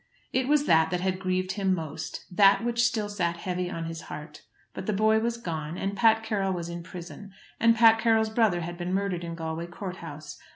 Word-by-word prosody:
It 260 0 +1
was 295 0 +3
that 160 - +4
that 180 0 -1
had 185 0 -1
grieved 185 0 -1
him 190 -2 +1
most, 160 -4 -6
that 200 +3 +6
which 235 0 +1
still 220 -4 -2
sat 175 -5 -1
heavy 180 0 -3
on 165 -2 -4
his 165 -1 -6
heart. 150 0 -8 0.3
But 190 - -7
the 215 - +1
boy 220 +2 +3
was 235 +1 -1
gone, 165 -6 -5
and 195 +1 -2
Pat 225 +2 +4
Carroll 200 -3 -1
was 170 -1 -4
in 170 0 -5
prison, 180 +3 -10 0.3
and 230 0 +5
Pat 225 -1 +6
Carroll's 225 -1 +2
brother 220 -6 +2
had 175 +1 -6
been 180 +2 -1
murdered 195 -3 -1
in 170 -1 -5
Galway 165 0 -4
court 180 +1 -7
house. 150 -2 -9
185 Hz, 215 wpm, -27 LUFS, 170-220 Hz, 0.3 s, that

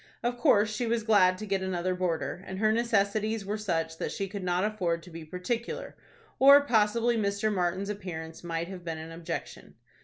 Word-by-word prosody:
Of 240 +1 0
course 215 -8 +4
she 240 +2 -1
was 230 -1 0
glad 185 -4 +4
to 215 - -6
get 195 -2 -1
another 185 -1 -1
boarder, 180 0 -2
and 190 - -5
her 215 +2 +3
necessities 220 -2 +1
were 205 +2 -2
such 165 -6 -2
that - - -2
she 195 - -3
could 195 0 -6
not 180 0 +1
afford 180 -6 -1
to 180 - -13
be 165 0 -8
particular, 180 +9 -4 0.4
or 280 +2 +9
possibly 230 0 +2
Mr. 205 0 0
Martin's 185 +1 -1
appearance 165 -6 -6
might 170 0 -3
have 185 -1 -8
been 165 -2 -4
an 160 +1 -8
objection. 165 0 -6
195 Hz, 190 wpm, -29 LUFS, 175-215 Hz, 0.4 s, or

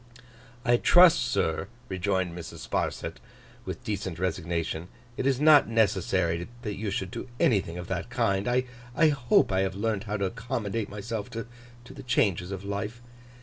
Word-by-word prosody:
'I 120 0 +5
trust, 175 +5 +7
sir,' 95 -7 0 0.2
rejoined 95 -2 -1
Mrs. 85 -2 -8
Sparsit, - - -2 0.5
with - - -6
decent 100 -6 -3
resignation, 85 -2 -2 0.3
'it 130 - -1
is 135 -2 +2
not 150 -1 +7
necessary 95 -6 +1 0.2
that 105 -3 -3
you 105 +1 -3
should 95 -1 -3
do - - -6
anything 95 -7 +2
of 90 - -5
that - - -3
kind. 100 +2 0
I 125 +3 +1
hope 120 -8 +3
I 95 - +2
have 95 -1 0
learnt 105 0 -1
how 105 0 -2
to 100 - 0
accommodate 115 0 -3
myself 105 +1 -5
to 115 -1 -5 0.4
the - - -10
changes 110 - +1
of 95 -1 -5
life. 105 +4 -4
100 Hz, 155 wpm, -28 LUFS, 95-120 Hz, 0.5 s, trust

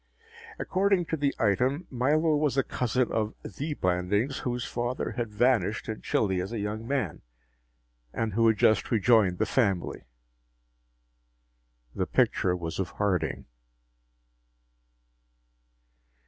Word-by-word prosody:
According 190 -1 +1
to - - +4
the 140 -2 0
item, 125 - +1
Milo 150 +5 +2
was 145 -3 0
a 135 - +4
cousin 125 0 -1
of 110 0 -1
the 150 +1 -4
Blandings, 95 +9 0
whose 125 -3 -3
father 120 0 -3
had 115 -1 -3
vanished 110 -2 +1
in 110 - -5
Chile 95 -4 0
as 95 +4 -5
a 115 - -3
young 105 +2 -4
man, 130 - -2 0.9
and 110 - -2
who 115 +2 +3
had 110 -1 +3
just 110 +1 +3
rejoined 110 -5 +3
the - - +1
family. 100 -9 0 1.9
The - - -2
picture 90 -1 +2
was 85 -1 -5
of 95 -3 -1
Harding! 100 -3 -1
115 Hz, 120 wpm, -28 LUFS, 100-130 Hz, 1.9 s, to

